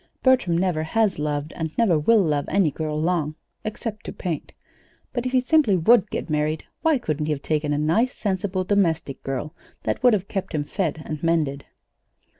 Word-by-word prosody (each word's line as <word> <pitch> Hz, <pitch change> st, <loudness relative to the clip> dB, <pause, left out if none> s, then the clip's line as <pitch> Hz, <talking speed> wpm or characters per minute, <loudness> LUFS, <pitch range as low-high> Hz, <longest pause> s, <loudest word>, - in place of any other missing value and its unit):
Bertram 255 Hz, -11 st, +4 dB
never 175 Hz, -3 st, +1 dB
has 195 Hz, +3 st, +1 dB
loved 150 Hz, 0 st, -2 dB
and 160 Hz, -2 st, -5 dB
never 195 Hz, -9 st, +3 dB
will 215 Hz, +7 st, +4 dB
love 150 Hz, -4 st, 0 dB
any 190 Hz, -6 st, +2 dB
girl 155 Hz, +1 st, -3 dB
long 155 Hz, -2 st, 0 dB, 0.3 s
except 215 Hz, 0 st, -5 dB
to -, -, -3 dB
paint. 170 Hz, -6 st, -4 dB, 0.6 s
But 245 Hz, 0 st, -1 dB
if -, -, -3 dB
he 255 Hz, -, +4 dB
simply 255 Hz, -, +3 dB
would 210 Hz, +5 st, +4 dB
get -, -, -4 dB
married, 155 Hz, 0 st, 0 dB, 0.2 s
why 320 Hz, -3 st, +3 dB
couldn't 155 Hz, -, -2 dB
he -, -, 0 dB
have 140 Hz, -, -6 dB
taken 150 Hz, -1 st, 0 dB
a 145 Hz, -, +1 dB
nice, 170 Hz, +12 st, +1 dB
sensible 190 Hz, -2 st, -1 dB
domestic 170 Hz, -8 st, 0 dB
girl 135 Hz, +4 st, -4 dB, 0.3 s
that -, -, -1 dB
would 250 Hz, -2 st, +6 dB
have 195 Hz, -2 st, 0 dB
kept 195 Hz, -5 st, -3 dB
him 150 Hz, -, 0 dB
fed 160 Hz, -1 st, -2 dB
and 155 Hz, -1 st, -5 dB
mended? 155 Hz, -4 st, 0 dB
165 Hz, 190 wpm, -24 LUFS, 150-210 Hz, 0.6 s, would